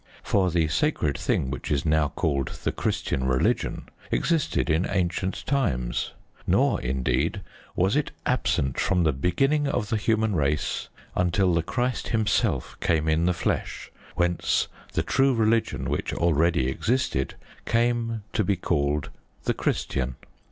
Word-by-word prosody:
For 95 -2 +2
the 85 -2 +2
sacred 75 - +1
thing 65 - 0
which 70 - -5
is 70 -2 0
now 80 -1 +3
called 70 -3 -1 0.2
the - - +1
Christian 65 - -1
religion 65 0 0 0.2
existed 165 - +1
in 80 +3 +1
ancient 95 0 -1
times, 80 - 0 0.3
nor, - - +3
indeed, 65 +8 0 0.3
was 95 +6 +2
it 150 -1 +1 0.2
absent 65 -2 0
from 90 -2 +2
the 80 -3 +3
beginning 135 - +1
of 120 -6 -1
the 110 - +1
human 110 -1 +1
race 75 -1 0 0.3
until 90 +1 +2
the 85 - +2
Christ 125 +9 -2
Himself 110 - 0
came 80 -1 +1
in 80 +2 +2
the - - +4
flesh, 85 - -2 0.2
whence 85 -1 +1 0.3
the - - +1
true 135 -1 +3
religion 115 0 +1
which - - -2
already 85 -3 +2
existed 110 - 0 0.3
came 115 -2 +1
to 110 - +2
be 100 +1 +1
called 75 -4 0 0.3
"the - - +1
Christian." 65 -1 -1
85 Hz, 140 wpm, -26 LUFS, 75-110 Hz, 0.3 s, the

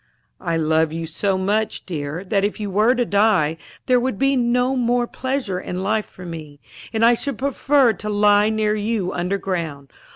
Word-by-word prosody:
"I 170 -2 -1
love 160 0 +2
you 165 +1 -4
so 190 +4 -1
much, 210 +3 -1
dear, 155 0 -4
that 195 0 0
if 205 +2 -1
you 205 -2 -4
were 215 +6 +3
to 245 -1 +1
die, 200 -7 +2 0.3
there 250 -1 +4
would 250 -4 -2
be 275 +3 +2
no 250 +1 +1
more 245 -1 +1
pleasure 255 -7 -3
in 185 0 -5
life 215 +1 0
for 180 - -12
me, 155 -4 -8 0.3
and 225 0 +2
I 235 - +6
should 265 +1 -3
prefer 275 -2 +2
to 210 +2 -6
lie 205 0 +4
near 215 -1 +1
you 210 -3 -1
underground. 175 -6 -3
205 Hz, 185 wpm, -21 LUFS, 180-235 Hz, 0.3 s, I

